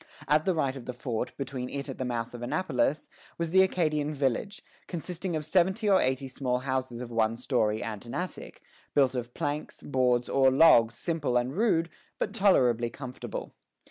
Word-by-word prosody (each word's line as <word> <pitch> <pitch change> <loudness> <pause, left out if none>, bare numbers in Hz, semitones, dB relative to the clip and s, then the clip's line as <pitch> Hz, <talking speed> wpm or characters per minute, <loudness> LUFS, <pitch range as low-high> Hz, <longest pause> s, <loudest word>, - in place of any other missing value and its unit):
At 150 +2 +3
the 185 - +2
right 140 -4 0
of 130 -3 -8
the 125 - -5
fort, 120 -3 -4
between 130 -2 -4
it 140 0 -5
and 135 - -7
the 130 - -1
mouth 120 -1 -3
of 120 - -7
the 120 - -4
Annapolis, 145 0 0 0.3
was 170 -1 -2
the 190 +1 +6
Acadian 155 -5 +1
village, 140 - -1 0.2
consisting 175 0 -4
of 155 -1 -3
seventy 190 +6 +2
or 195 -2 +5
eighty 130 +1 0
small 130 -1 -1
houses 130 -2 -2
of 120 -1 -7
one 115 0 +1
story 110 -4 0
and 105 -1 -5
an - - -6
attic, 180 +1 -6 0.3
built 135 -3 +4
of 120 -1 -5
planks, 150 -2 -4
boards, 125 -3 +1
or 135 -1 +4
logs, 120 -5 +6
simple 150 -5 0
and 125 +3 -1
rude, 180 -6 +2 0.3
but - - -2
tolerably 125 - +3
comfortable. 125 +1 -7
135 Hz, 185 wpm, -28 LUFS, 125-165 Hz, 0.3 s, the